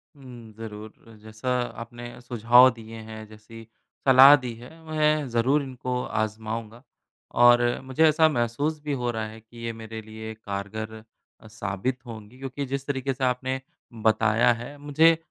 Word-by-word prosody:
हुँ, 120 -5 -12
ज़रूर 110 0 -10
जैसा 110 +4 -6 0.3
आपने 120 +1 -10
सुझाव 120 +1 +5
दिए 115 0 -11
हैं, 110 0 -8
जैसी 110 +1 -13 0.4
सलाह 135 +2 +10
दी 120 - -4
है, 120 +2 -12
मैं 155 -2 +1
ज़रूर 125 +5 +2
इनको 125 -1 -4 0.2
आजमाऊँगा 110 +2 -6 0.6
और 120 0 +7 0.2
मुझे 130 +4 0
ऐसा 160 +1 +5
महसूस 140 +4 -1
भी 145 -1 -2
हो 120 - -1
रहा 110 -1 -3
है 110 +1 -11
कि 115 +1 -13
ये 115 - -3
मेरे 110 0 -8
लिए 110 0 -8
कारगर 110 +1 -6 0.5
अ, 110 - -14
साबित 105 +3 -3
होंगी 115 +1 -10
क्योंकि 135 +1 -5
जिस 135 +1 -4
तरीके 135 -1 -1
से 130 0 -6
आपने 130 +1 0 0.4
बताया 110 +2 +4
है 140 +4 -8
अ, - - -16
मुझे 155 +3 +4
120 Hz, 155 wpm, -25 LUFS, 110-130 Hz, 0.6 s, सलाह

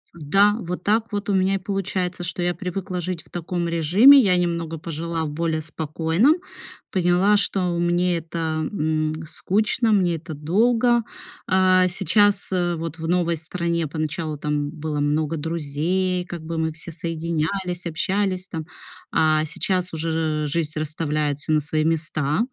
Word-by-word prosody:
Да, 195 +7 +3
вот 180 -3 -5
так 220 +2 +1
вот 205 0 -3
у - - +2
меня 190 0 +2
и - - +1
получается, 185 -2 -2
что 175 +1 -3
я 175 0 0
привыкла 180 +1 -4
жить 175 -1 -4
в - - -22
таком 175 0 -3
режиме. 180 - +7
Я 195 -8 +4
немного 170 -2 -1
пожила 165 +1 -3
в - - -3
более 160 +1 -1
спокойном, 160 - +1 0.6
поняла, 185 +3 +3
что 180 -4 0
мне 175 +1 +1
это, 160 -1 -3
м, 155 -3 -1
скучно, 215 +7 0
мне 180 -5 +3
это 160 0 -7
долго. 230 - +2 0.4
А, 185 -1 +4
сейчас, 205 +2 +2
э, 175 -2 0
вот 165 -1 -5
в 160 -1 -5
новой 170 -1 +1
стране 170 +1 -2
поначалу 155 0 -3
там 145 0 -2
было 155 -1 -4
много 150 +2 0
друзей, 170 +4 -1
как 175 -2 -7
бы 165 +1 -4
мы 160 0 0
все 155 +2 -7
соединялись, 170 +3 -3
общались 185 +3 -1
там. 160 -3 -5 0.5
А 155 -1 +3
сейчас 180 +3 -1
уже 160 -1 -1
жизнь 155 0 -2
расставляет 150 -1 -1
всё 150 - -4
на 155 - +4
свои 155 +1 -1
места: 155 -1 0
170 Hz, 155 wpm, -23 LUFS, 155-185 Hz, 0.6 s, режиме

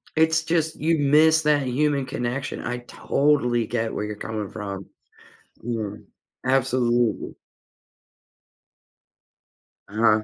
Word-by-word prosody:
It's 160 0 +3
just 160 -1 0
you 160 0 +1
miss 155 +3 +5
that 145 -2 +3
human 140 +1 +1
connection. 130 +1 -3
I 125 0 -3
totally 125 -2 +1
get 115 0 -2
where 105 - -2
you're 105 0 -5
coming 105 -1 -5
from. 100 -2 -6 0.8
Yeah, 110 -3 -3 0.5
absolutely. 125 -3 +1 2.6
Uh-huh. 110 +1 +3
125 Hz, 100 wpm, -24 LUFS, 110-150 Hz, 2.6 s, miss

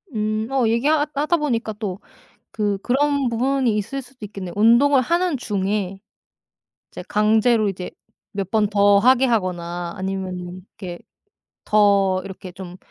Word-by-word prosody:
음, 215 +1 -1
어 260 -4 +2
얘기 235 +5 +1
하 310 -1 +4
하다 300 +4 +1
보니까 235 -7 -1
또 205 -3 -5 0.5
그 205 -2 -1
그런 280 +3 +1
부분이 250 -1 +1
있을 275 +7 -3
수도 250 -3 -11
있겠네. 195 -3 -7
운동을 240 +6 +5
하는 340 +2 0
중에 195 -3 -2 0.9
이제 - - -8
강제로 215 +1 +3
이제 185 -2 -6 0.4
몇 195 -2 -4
번 215 -2 +2
더 200 -1 +4
하게 255 +3 +4
하거나 175 -6 -2
아니면은 185 -2 -4 0.2
이렇게 180 -3 -7 0.7
더 200 -3 +3
이렇게 190 -1 -9
좀 180 0 -9
210 Hz, 270 characters per minute, -21 LUFS, 195-250 Hz, 0.9 s, 운동을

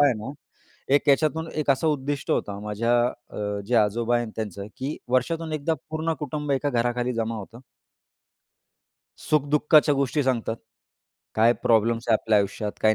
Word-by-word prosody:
काय 145 - +7
आहे 125 - +1
ना, 135 - -5 0.6
एक 145 - +2
याच्यातून 155 +3 +2
एक 150 -2 0
असं 155 +4 +2
उद्दिष्ट 145 -1 -2
होतं 100 0 -1
माझ्या 105 +3 0 0.4
अ, 105 -1 -3
जे 125 - -1
आजोबा 115 +3 +2
आहे 120 - -1
त्यांचं, 100 -2 -5
की 140 +4 -4
वर्षातून 160 +6 0
एकदा 155 +2 0 0.2
पूर्ण 160 +1 -1
कुटुंब 150 0 -4
एका 140 +1 0
घराखाली 120 +1 0
जमा 115 0 -1
होतं. 115 +3 -9 1.7
सुख 150 -2 +2
दुःखाच्या 150 0 +4
गोष्टी 140 +2 0
सांगतात, 120 -4 -1 0.8
काय 115 +2 +5
प्रॉब्लेम्स 115 +1 +2
आहे 115 - +5
आपल्या 110 -2 +3
आयुष्यात 105 +1 -2
काही 110 0 +4
125 Hz, 160 wpm, -25 LUFS, 110-145 Hz, 1.7 s, काय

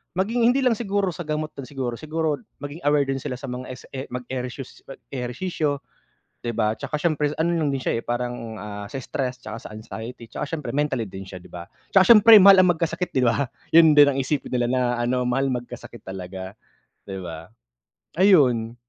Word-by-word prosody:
maging 230 +6 +2
hindi 265 +2 +3
lang 250 -2 +4
siguro 200 -4 0
sa 170 0 -8
gamot 155 0 -2
din 130 - -6
siguro 125 -4 -4
siguro 155 -2 -2 0.2
maging 145 +3 -6
aware 145 -1 +4
din 135 0 -2
sila 125 - -4
sa 135 - -9
mga 125 +1 -6
es 130 0 -9
e 135 0 -6
mag-ereshus 125 +1 -6
mag-ehersisyo 140 +3 -3 0.6
'di 120 -1 -3
ba? 110 -1 +2
Tsaka 150 - -4
siyempre 150 -3 +1
ano 170 +1 +1
lang 150 -3 +1
din - - 0
siya 115 - -1
parang, 120 -2 -4
ah, 105 -1 -7
sa 135 - -6
stress 125 0 -3
'tsaka 110 - -7
sa - - -9
anxiety, 115 +2 -8
tsaka - - -4
siyempre 150 - -6
mentally 140 -5 0
din 95 - -8
siya 95 0 -9
'di - - -19
ba? 85 -1 -8 0.3
Tsaka 190 - +7
siyempre 220 +1 +9
mahal 195 -1 +9
ang 180 - +5
magkasakit 170 +2 -3
'di 130 - +2
ba? 115 +3 +2 0.3
Yun 160 -2 +8
din 145 -1 +8
ang 135 - -2
isipin 135 +2 -1
nila 125 -1 0
na 130 -1 +1 0.2
ano 125 +1 0
mahal 130 +2 +1
magkasakit 120 -2 -7
talaga 95 +1 -8 0.5
'di 95 -1 -7
ba? 80 -1 -8 0.7
Ayun. 125 - +4
130 Hz, 195 wpm, -23 LUFS, 120-155 Hz, 0.7 s, siyempre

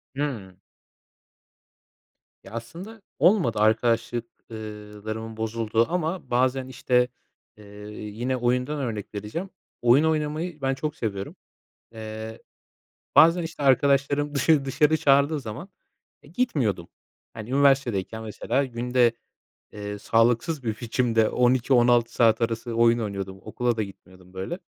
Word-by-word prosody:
Hımm. 115 -11 -4 1.8
Ya 95 - -13
aslında 170 - -8 0.2
olmadı 155 - +3
arkadaşlık 115 +2 +1 0.3
ııı, 105 -1 -9
larımın 110 0 -5
bozulduğu 110 0 0
ama 175 +1 -2
bazen 130 +1 +1
işte, 125 -1 +1 0.5
ııı, 105 0 -11
yine 110 +5 -4
oyundan 125 +4 0
örnek 110 -5 -4
vereceğim. 110 - -5 0.3
Oyun 120 +5 +5
oynamayı 155 +1 -1
ben 135 0 +1
çok 150 +3 -4
seviyorum. 100 -7 -4 0.6
Iıı, 110 0 -7 0.8
bazen 170 +2 +7
işte 160 -2 -6
arkadaşlarım 140 +2 +2
dışarı, 145 0 +3
dışarı 150 +3 +2
çağırdığı 140 +1 +3
zaman, 115 - -7 0.5
e, - - -17
gitmiyordum. 140 - -1 0.4
Hani, 110 +1 -8
üniversitedeyken 130 -6 +2
mesela 115 +5 -1
günde, 125 -1 +1 0.6
eee, 105 0 -6
sağlıksız 120 +7 +1
bir 110 -2 -3
biçimde 115 -2 +1
12-16 120 -1 +3
saat 115 -1 +3
arası 115 +1 -2
oyun 115 0 +4
oynuyordum. 100 -3 -5
Okula 120 +3 -2
da 110 - +1
gitmiyordum 95 -2 -14
böyle. 95 - -5
120 Hz, 115 wpm, -25 LUFS, 110-140 Hz, 1.8 s, bazen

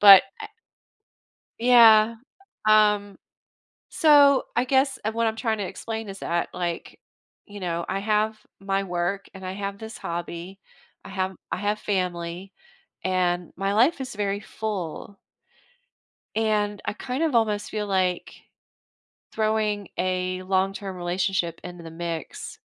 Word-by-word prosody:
but 200 -2 +11 0.2
I 425 - -6 1.1
Yeah, 230 -2 +7 0.5
um, 210 -2 +4 0.7
so, 285 -4 +6
I 240 +2 +2
guess, 265 +1 +2
uh, 220 - +1
what 230 +1 +1
I'm 220 - -1
tryna 220 -4 -1
explain 225 -2 -5
is 195 0 -8
that, 170 0 -1
like, 175 -2 -4 0.5
you 205 -1 -10
know, 170 -2 -2
I 195 - -1
have 215 +1 +1 0.2
my 195 0 -1
work, 180 +1 -2
and 190 -1 -9
I 185 - -4
have 200 0 -4
this 220 +2 -8
hobby, 175 +2 -6 0.5
I - - -9
have 190 -1 -2 0.2
I - - -1
have 205 +2 -1
family, 180 -2 -3 0.5
and 180 -2 0
my 195 +1 -1
life 255 +8 +3
is 255 -4 -6
very 200 -1 -1
full 200 -3 -5 1.2
and 210 -2 0
I - - -1
kind 255 +7 -3
of 310 -6 +1
almost 210 -3 +1
feel 210 -1 -3
like, 185 -2 0 1.0
throwing 215 -2 0
a 185 0 -1
long-term 190 0 -1
relationship 175 -1 -1
into 175 -1 -8
the 165 - -9
mix, 165 -2 -6
200 Hz, 135 wpm, -25 LUFS, 185-220 Hz, 1.2 s, but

